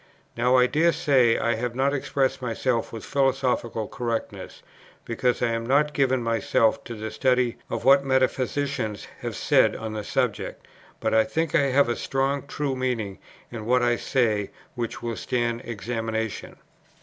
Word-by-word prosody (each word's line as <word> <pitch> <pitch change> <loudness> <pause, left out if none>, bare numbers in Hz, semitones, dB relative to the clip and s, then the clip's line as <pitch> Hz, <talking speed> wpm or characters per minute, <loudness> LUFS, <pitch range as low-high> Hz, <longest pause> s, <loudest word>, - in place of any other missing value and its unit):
Now, 125 +2 +3
I 125 -1 +6
dare 160 +6 +2
say, 130 -6 +3
I 120 - +1
have 120 +1 -3
not 135 +2 +1
expressed 135 -1 0
myself 120 0 -1
with 115 - -7
philosophical 130 -5 0
correctness, 115 -2 -5 0.4
because 125 +2 0
I 120 - +2
have 115 0 -2
not 150 +3 +3
given 130 -3 +1
myself 115 -1 +1
to 120 - -6
the 110 0 -5
study 125 +1 +1
of - - -4
what 140 +1 +6
metaphysicians 130 -4 0
have - - -5
said - - +3
on 110 -1 -5
the 105 -1 -4
subject; - - -2 0.3
but - - -1
I 110 0 +5
think 160 +6 -2
I 140 - +4
have 135 0 +3
a 120 - 0
strong 135 +1 -1
true 140 -1 -2
meaning 120 -7 -2 0.3
in 110 -2 -6
what 125 0 +3
I 120 0 +3
say 110 -5 0 0.2
which 120 -2 -5
will 115 -1 -2
stand 120 -1 -1
examination. 110 -1 -4
125 Hz, 160 wpm, -25 LUFS, 115-135 Hz, 0.4 s, I